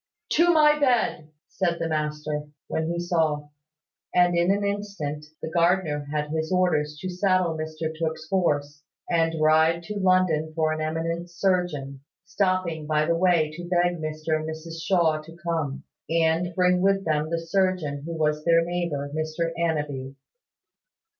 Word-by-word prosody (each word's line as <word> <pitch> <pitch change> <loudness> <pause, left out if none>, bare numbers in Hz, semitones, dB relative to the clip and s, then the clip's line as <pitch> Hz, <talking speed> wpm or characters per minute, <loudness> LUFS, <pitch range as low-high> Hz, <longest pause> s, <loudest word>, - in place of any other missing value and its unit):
"To 345 +3 +5
my 300 -2 +5
bed!" 240 - +1 0.2
said 175 -3 -1
the 165 - -2
master, 150 -1 -2 0.2
when 160 0 -2
he 170 +1 -2
saw: 160 -4 0 0.7
and 175 -1 +4
in 170 +1 +2
an 200 +1 +2
instant 200 -8 -4 0.2
the 160 - -4
gardener 170 -4 +1
had 150 0 -2
his 160 +2 -2
orders 155 -5 +1
to 185 - -3
saddle 185 -2 +1
Mr 155 0 -4
Tooke's 160 -1 -3
horse, 150 -5 0 0.3
and 165 -1 +1
ride 160 +2 +4
to 210 +4 -5
London 185 -5 +2
for 160 -1 +1
an 155 0 -2
eminent 165 +2 -2
surgeon: 170 -7 -1 0.2
stopping 185 -5 -1
by 155 0 +2
the 170 +1 +1
way 170 -3 +3
to 175 +2 -8
beg 175 0 +2
Mr 155 0 -2
and 155 0 -5
Mrs 165 +1 -7
Shaw 165 -5 +2
to 165 +2 -13
come, 160 -5 -2 0.3
and 165 +1 +1
bring 180 -1 +3
with 195 0 +2
them 155 -1 0
the 170 - 0
surgeon 165 -4 0
who 165 +1 -5
was 150 -1 0
their 165 0 +4
neighbour, 170 -5 -2
Mr 155 +1 -2
Annanby. 145 -5 -2
165 Hz, 155 wpm, -25 LUFS, 155-180 Hz, 0.7 s, To